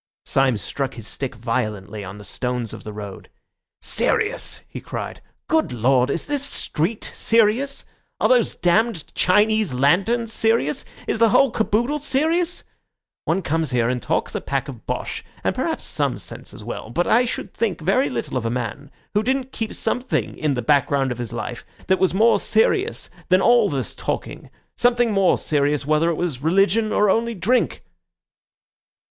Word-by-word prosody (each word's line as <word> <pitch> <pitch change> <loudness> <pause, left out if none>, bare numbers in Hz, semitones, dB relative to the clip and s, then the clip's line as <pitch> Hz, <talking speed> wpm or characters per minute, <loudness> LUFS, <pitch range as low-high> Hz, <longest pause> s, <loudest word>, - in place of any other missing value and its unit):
Syme 135 -4 +2
struck 135 +7 -3
his 115 -3 -7
stick 135 -2 -4
violently 110 -3 -3
on 95 +1 -8
the 105 - -10
stones 125 +2 -3
of - - -9
the 105 - -6
road. 105 -2 -8 0.5
"Serious!" 455 +1 0
he - - -8
cried. - - -6 0.3
"Good 320 0 +2
Lord! 125 +2 +2
is 160 - -1
this 290 -2 -1
street 210 - -1
serious? 230 +5 +2 0.3
Are - - +3
these 245 -3 +3
damned 180 -1 +1
Chinese 210 -4 +3
lanterns 200 - +2
serious? 225 -12 +1 0.2
Is - - -1
the 230 -1 +5
whole 270 +4 +4
caboodle 235 +7 0
serious? 320 +6 0 0.6
One 190 - 0
comes 160 0 0
here 120 -2 +1
and 125 -1 -1
talks - - -1
a - - -2
pack - - -2
of - - -10
bosh, - - -3 0.2
and - - +1
perhaps - - -2
some - - -1
sense - - -8
as - - -11
well, - - -6
but 170 +9 0
I 245 +2 +4
should 235 - -4
think 210 -8 -1
very 195 - +2
little 240 - -3
of 120 - -3
a - - 0
man 125 +4 -4 0.2
who 210 - +3
didn't 260 +3 -1
keep 225 -3 -4
something 250 +3 -1
in 150 -3 0
the 125 - -2
background 140 0 +2
of 125 - -5
his 120 -1 -4
life 120 +1 -5 0.2
that 190 0 +2
was 190 - +3
more 225 +5 +4
serious 385 - +1 0.2
than 185 +1 +5
all 230 0 +5
this 135 -7 -2
talking—something 240 -1 -1
more 195 -3 +3
serious, 145 -1 0
whether 155 +3 +2
it 170 - 0
was 155 -8 -3
religion 195 +7 +2
or 210 - +3
only 230 +3 +1
drink." 225 +8 +1
180 Hz, 170 wpm, -22 LUFS, -, 0.6 s, the